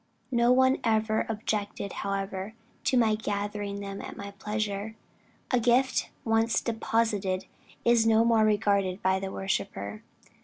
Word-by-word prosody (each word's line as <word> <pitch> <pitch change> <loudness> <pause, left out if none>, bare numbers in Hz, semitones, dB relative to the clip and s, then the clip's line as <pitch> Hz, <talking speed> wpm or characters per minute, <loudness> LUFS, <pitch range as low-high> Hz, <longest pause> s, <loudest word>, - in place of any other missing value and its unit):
No 235 0 +4
one 260 +1 +4
ever 220 -1 +1
objected 210 -2 -3
however 195 +1 -3 0.3
to 255 - +3
my 225 -3 +4
gathering 205 -1 -3
them 195 0 -6
at 200 0 -8
pleasure. 210 0 -3 0.6
A 250 - +4
gift 245 +3 +2 0.2
once 225 0 +2
deposited 220 -5 0 0.4
is 235 -1 +4
no 225 0 +5
more 230 -2 +4
regarded 200 -3 +1
by 190 0 +3
the 190 0 -4
worshipper." 100 - -3
210 Hz, 125 wpm, -28 LUFS, 200-225 Hz, 0.6 s, no